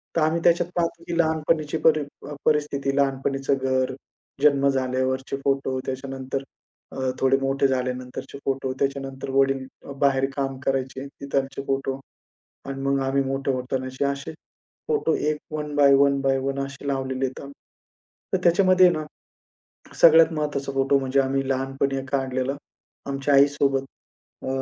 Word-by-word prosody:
तर 165 - +2
आम्ही 160 +2 +2
त्याच्यात 175 0 +3
पाहतो 170 -1 -1
की 170 -1 -2
लहानपणीची 160 -1 +1
परी 155 -1 +6 0.3
अ, - - -5
परिस्थिती 145 -2 +1
लहानपणीच 135 0 0
घर, 130 -1 +1 0.5
जन्म 140 -2 +5
झाल्यावरचे 130 0 -1
फोटो 135 -1 0
त्याच्यानंतर 135 0 -4 0.5
अ, - - -9 0.2
थोडे 135 0 +3
मोठे 135 +1 +2
झाल्यानंतरचे 125 +1 -3
फोटो, 135 -1 -1
त्याच्यानंतर 135 -1 -3
वडील 135 0 +2 0.4
बाहेर 135 -1 +3
काम 135 -1 -2
करायचे 135 0 -1
तिकडचे 140 -1 -3
फोटो 135 0 -1 0.7
अन 135 0 -5
मग 140 0 +1
आम्ही 135 +1 +1
मोठे 135 +1 -2
होतानाचे 130 +1 -3
असे 140 +2 -2 0.6
फोटो 445 - +1
एक 150 0 0
one 150 -1 -4
by 140 -1 +6
one 140 0 +4
by 135 -1 +2
one 135 +1 -2
असे 135 +1 -10
लावलेले 135 -1 -1
आहेत 130 0 -3
आम्ही. 140 0 -9 0.8
तर - - +3
त्याच्यामध्ये 185 +1 +5
आहे 175 - +4
ना, 155 - -3 1.0
सगळ्यात 160 0 +7
महत्वाचा 145 -3 -2
फोटो 135 +1 +2
म्हणजे 135 +1 +1
आम्ही 135 0 0
लहानपणी 135 +1 -1
एक 135 0 -7
काढलेला 135 0 -1 0.5
आमच्या 140 +1 0
आईसोबत. 140 -1 +3 0.6
अ, - - -5
135 Hz, 145 wpm, -24 LUFS, 135-140 Hz, 1.0 s, सगळ्यात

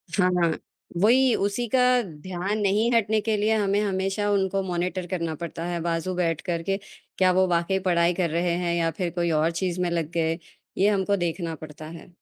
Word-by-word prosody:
हाँ, 185 -2 +3
हाँ। 165 -1 +3 0.5
वही 250 +4 +5
उसी 205 +5 -1
का 260 - +2 0.2
ध्यान 185 +3 -4
नहीं 210 +4 +2
हटने 220 -2 +2
के 220 0 0
लिए 215 +2 +2
हमें 205 -1 +1
हमेशा 195 +1 -1
उनको 195 -1 +1
मॉनिटर 180 0 -2
करना 170 -3 -2
पड़ता 165 +1 -6
है 175 -1 -2
बाजू 170 +2 -1
बैठकर 170 -1 -1
के, 195 +2 0 0.4
क्या 185 -1 +4
वो 185 +1 +3
वाक़ई 175 +2 +1
पढ़ाई 170 0 +3
कर 175 -1 0
रहे 170 +2 0
हैं 175 -1 -1
या 165 -1 +1
फिर 180 -2 -1
कोई 170 -1 0
और 165 +2 +2
चीज़ 180 +1 -2
में 180 - +1
लग 165 -2 -2
गए, 165 -1 0 0.4
ये 200 +2 +4
हमको 200 0 +1
देखना 170 -1 -2
पड़ता 155 0 -10
है। 165 +1 -10
180 Hz, 195 wpm, -25 LUFS, 170-200 Hz, 0.5 s, वही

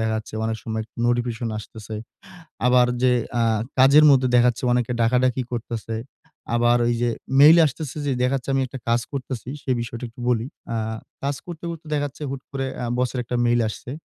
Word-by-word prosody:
দেখা 110 0 0
যাচ্ছে 110 0 -7
অনেক 110 0 -1
সময় 110 -1 -2 0.2
নোটিফিকেশন 120 -1 0
আসতেছে। 110 0 -9 0.7
আবার 125 0 +5 0.2
যে 130 -1 +5 0.3
আ - - +3 0.4
কাজের 140 +4 +7
মধ্যে 130 -2 +4
দেখা 120 0 +6
যাচ্ছে, 120 +1 -2
অনেকে 120 -1 +1
ডাকাডাকি 125 +2 +2
করতেছে। 115 -1 -4 0.6
আবার 120 +1 +4
ওই 120 - +2
যে 120 - +2 0.3
মেইল 155 +4 +9
আসতেছে 145 0 -5
যে 140 - +1
দেখা 125 +2 +2
যাচ্ছে, 130 +1 -5
আমি 135 - +2
একটা 130 +1 -8
কাজ 120 +1 +3
করছি 130 -3 -5
সে - - -4
বিষয়টা 115 +1 -5
একটু 115 +1 -15
বলি। 120 -1 +1 0.3
আ - - 0 0.5
কাজ 140 +1 0
করতে, 170 -2 -8
করতে 165 -1 -8
দেখা 145 -1 0
যাচ্ছে 145 +2 -11
হুট 135 - -5
করে 135 -1 -3 0.2
আ - - -2
বসের 125 0 0
একটা 125 +1 -2
মেইল 120 0 +3
আসছে। 115 - -8
125 Hz, 190 wpm, -23 LUFS, 115-135 Hz, 0.7 s, মেইল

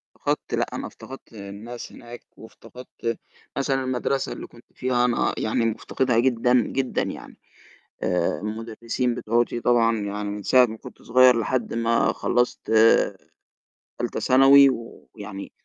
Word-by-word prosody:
فقدت - - -3
لأ، - - +1
أنا - - -5
افتقدت 135 -2 -12
الناس 105 +3 -9
هناك 120 0 -11
وافتقدت 115 +1 -8 0.4
مثلًا 135 -1 0
المَدرسة 130 +1 -1
اللي - - -7
كنت 120 - -18
فيها 125 -1 0
أنا 120 -1 +1
يعني 115 +2 0
مفتقدها 115 +2 0
جدًا 125 0 +2
جدًا 130 -1 -1
يعني. - - -7 0.7
آآ 90 -3 0
المُدرسين 115 +3 -3
بتوعتي 120 +1 0
طبعًا 115 -2 +2
يعني 105 0 -4
من 105 0 -6
ساعة 125 +3 +5
ما 110 -1 -8
كنت - - -13
صغير 125 0 +5
لحد 120 +1 -2
ما 115 0 +1
خلَّصت 120 0 0 1.4
تالتة - - -3
ثانوي 135 +1 +6
ويعني 105 -4 -8
120 Hz, 130 wpm, -24 LUFS, 110-125 Hz, 1.4 s, ثانوي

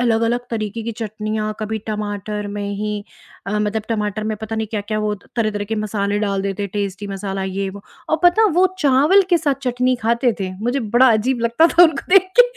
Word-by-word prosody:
अलग-अलग 230 0 +2
तरीके 220 0 -3
की 230 - -4
चटनियाँ, 215 -1 -3
कभी 220 +1 -2
टमाटर 210 -1 -4
में 205 0 -4
ही 210 0 -3 0.4
अ, 210 +1 -1
मतलब 210 +1 -1
टमाटर 210 -1 -2
में 215 0 -2
पता 220 0 -4
नहीं 220 - -1
क्या-क्या 215 0 -2
वो 210 0 0
त 200 - -18
तरह-तरह 215 -2 0
के 220 +2 -3
मसाले 205 -1 -1
डाल 200 -2 -1
देते, 200 +1 -2
टेस्टी 200 0 -4
मसाला, 195 0 -4
ये 195 +1 -2
वो 200 +1 -11 0.3
और 315 - +2
पता 430 +6 +5
वो 365 +2 +5
चावल 295 +6 +5
के 345 - +5
साथ 290 -4 +1
चटनी 250 0 +1
खाते 235 +2 +2
थे, 190 -1 -2
मुझे 250 +3 0 0.2
बड़ा 260 0 +7
अजीब 240 +3 0
लगता 235 +8 +4
था 345 +1 +5
उनको 315 -4 +1
देख 380 -1 +6
के - - +12
215 Hz, 205 wpm, -20 LUFS, 205-240 Hz, 0.4 s, के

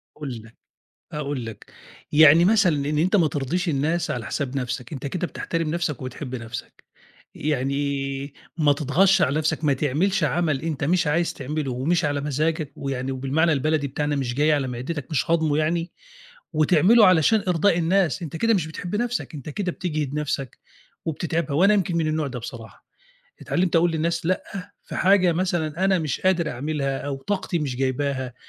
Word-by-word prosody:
هاقول 135 -6 -6
لك 115 +1 -17 0.6
أأقول 145 -5 -3
لك، 115 - -10 0.4
يعني 155 +3 +7
مثلًا 200 -6 +4
إن 150 - 0
أنت 180 +7 +2
ما 170 -6 +4
ترضيش 150 +6 -2
الناس 160 +4 0
على 120 -3 -4
حساب 140 -3 -3
نَفْسك 125 0 -4
أنت 140 0 -5
كده 175 +4 -2
بتحترم 165 -2 -3
نَفْسك 170 -5 -2
وبتحب 130 0 -6
نَفْسك. 115 -1 -8 0.5
يعني، 140 -1 -2 0.2
ما 150 -3 +4
تتغطش 175 +7 +3
على 140 +3 +2
نَفْسك، 155 +1 -1
ما 145 - +3
تعملش 160 +8 0
عمل 155 -2 +1
أنت 160 -3 -3
مش 170 +3 +2
عايز 165 +3 +1
تعمله 145 0 -3
ومش 150 +7 0
على 145 -1 -1
مزاجك، 150 +1 -1
ويعني 135 -1 -3
وبالمعنى 135 +6 +1
البلدي 150 +1 0
بتاعنا 145 +2 -2
مش 130 -3 -2
جاي 150 +4 +3
على 140 -3 0
معدتك 130 +4 -5
مش 155 +3 0
هاضمه 160 -3 +2
يعني، 165 +3 0 0.6
وتعمله 180 +8 +5
علشان 185 +5 +4
إرضاء 175 +1 +3
الناس، 170 -4 +1
أنت 165 -1 -5
كده 230 +6 +2
مش 175 -6 0
بتحب 175 +5 -5
نَفْسك 240 -5 -2
أنت 145 -1 -8
كده 180 +4 -2
بتجهِد 155 -6 -3
نَفْسك 140 -4 -3 0.5
وبتتعبها 160 -1 -2
وأنا 195 +5 +5
يمكن 180 -4 0
من 165 -2 +1
النوع 155 -1 0
ده 125 -2 -5
بصراحة، 115 -1 -10 0.6
اتعلِّمت 180 -1 0
أقول 165 +1 +4
للناس 165 +1 -1
لأ 185 +2 0 0.4
في - - -8
حاجة 185 -2 +4
مثلًا 175 -1 -1
أنا 190 -2 +3
مش 155 -4 -3
قادر 180 -4 +2
أعملها 140 +1 -2
أو 140 -1 -4
طاقتي 190 +1 -2
مش 140 -5 -2
جايباها، 130 -1 -1
155 Hz, 170 wpm, -24 LUFS, 135-170 Hz, 0.6 s, يعني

